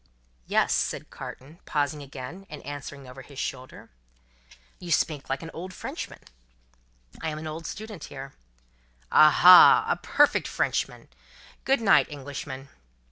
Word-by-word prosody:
"Yes," - - +2
said - - -2
Carton, 150 +6 -10
pausing 145 0 -1
again, 140 +7 -9
and 150 - -10
answering 145 -1 -8
over 130 +1 -11
his 140 +1 -15
shoulder. 130 - -6 0.9
"You 175 -2 -7
speak 150 -3 0
like 135 +4 -2
a 165 +3 -7
Frenchman." 185 - -7 1.0
"I 160 - -2
am 155 - -5
an 155 - -7
old 155 +1 -6
student 210 -6 -8
here." 135 0 -9 0.8
"Aha, 175 +4 +8
a - - +2
perfect - - +2
Frenchman! - - -2 0.6
Good 270 -1 +2
night, 200 -3 +5
Englishman." 140 -1 -8
145 Hz, 130 wpm, -26 LUFS, 135-165 Hz, 1.0 s, Aha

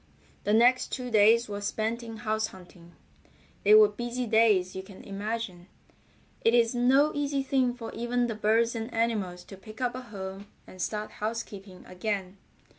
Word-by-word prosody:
The 210 - +2
next 245 +3 +4
two 250 -2 -4
days 225 +2 +5
were 205 -1 -5
spent 220 +3 -2
in 225 -1 -8
house 215 0 -1
hunting. 175 -3 -15 0.7
They 210 +1 +7
were 215 -1 +8
busy 240 +4 -4
days 215 -5 +3
you 190 - -4
can 190 0 -13
imagine. 200 -3 -5 0.8
It 230 - +4
is 230 -1 +3
no 265 +5 +4
easy 285 -1 -1
thing 260 -2 +1
for 230 -2 -7
even 240 +1 0
the 235 - -2
birds 220 +2 +2
and 225 +1 -5
animals 210 -6 -1
to 195 - -12
pick 215 +3 -13
up 250 -1 0
a 255 - -6
home 195 -3 -8 0.2
and 185 - -10
start 215 +1 -3
housekeeping 210 -4 -6
again. 190 0 -4
220 Hz, 170 wpm, -28 LUFS, 200-240 Hz, 0.8 s, were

